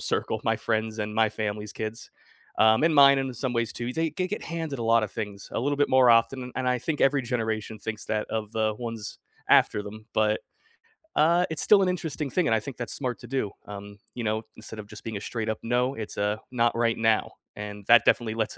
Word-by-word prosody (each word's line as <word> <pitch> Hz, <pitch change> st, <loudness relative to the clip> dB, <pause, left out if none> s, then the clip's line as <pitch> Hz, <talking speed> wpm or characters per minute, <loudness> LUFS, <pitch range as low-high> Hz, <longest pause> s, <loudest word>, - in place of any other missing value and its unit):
circle, -, -, -1 dB
my -, -, +2 dB
friends 110 Hz, -1 st, -2 dB
and 105 Hz, 0 st, -3 dB
my 110 Hz, 0 st, +4 dB
family's 105 Hz, 0 st, -4 dB
kids, 110 Hz, +1 st, -6 dB, 0.5 s
um, 110 Hz, +2 st, +5 dB
and 160 Hz, 0 st, +4 dB
mine, 140 Hz, -1 st, +8 dB
in 135 Hz, -1 st, -2 dB
some 125 Hz, +1 st, -3 dB
ways 115 Hz, -1 st, 0 dB
too, 120 Hz, +1 st, -4 dB
they 165 Hz, +2 st, 0 dB
they 180 Hz, +4 st, -2 dB
get 210 Hz, -, -4 dB
handed 160 Hz, -5 st, -4 dB
a -, -, -2 dB
lotta 115 Hz, -1 st, +3 dB
things 100 Hz, -1 st, -6 dB
a -, -, -1 dB
little 145 Hz, +3 st, 0 dB
bit 145 Hz, -, +2 dB
more 130 Hz, -2 st, +6 dB
often, 125 Hz, +2 st, +2 dB
and 130 Hz, -1 st, 0 dB
I 125 Hz, -, +2 dB
think 150 Hz, +4 st, -3 dB
every 135 Hz, 0 st, +3 dB
generation 110 Hz, -3 st, -2 dB
thinks 110 Hz, +1 st, -5 dB
that 105 Hz, -1 st, -1 dB
of 110 Hz, -2 st, -3 dB
the 110 Hz, -1 st, 0 dB
ones 115 Hz, -2 st, -6 dB, 0.3 s
after 105 Hz, -, +4 dB
them. 110 Hz, +2 st, -10 dB
But, 110 Hz, 0 st, +2 dB, 0.8 s
uh, 170 Hz, +4 st, +4 dB
it's 160 Hz, -, -3 dB
still 205 Hz, -2 st, +6 dB
an 185 Hz, -, +2 dB
interesting 160 Hz, -5 st, -3 dB
thing, 180 Hz, +5 st, +1 dB
and -, -, +3 dB
I -, -, +2 dB
think 130 Hz, +4 st, -8 dB
that's 120 Hz, -, -5 dB
smart 125 Hz, -3 st, -3 dB
to 120 Hz, -, -11 dB
do, 125 Hz, -5 st, -2 dB, 0.2 s
um, 100 Hz, 0 st, -9 dB
you 120 Hz, -, -5 dB
know, 110 Hz, +1 st, 0 dB
instead 110 Hz, 0 st, -9 dB
of 105 Hz, -, -8 dB
just 105 Hz, 0 st, -11 dB
being 110 Hz, -2 st, -3 dB
a -, -, -7 dB
straight 110 Hz, 0 st, -3 dB
up 110 Hz, -, -2 dB
"No," 125 Hz, +3 st, +1 dB
it's 110 Hz, -2 st, -7 dB
a 105 Hz, +1 st, 0 dB
"not 120 Hz, -2 st, +2 dB
right 115 Hz, -1 st, +1 dB
now." 110 Hz, -1 st, +2 dB, 0.2 s
And 105 Hz, -1 st, -7 dB
that 120 Hz, 0 st, +7 dB
definitely 110 Hz, -2 st, +2 dB
lets 110 Hz, -1 st, -2 dB
115 Hz, 235 wpm, -26 LUFS, 110-130 Hz, 0.8 s, mine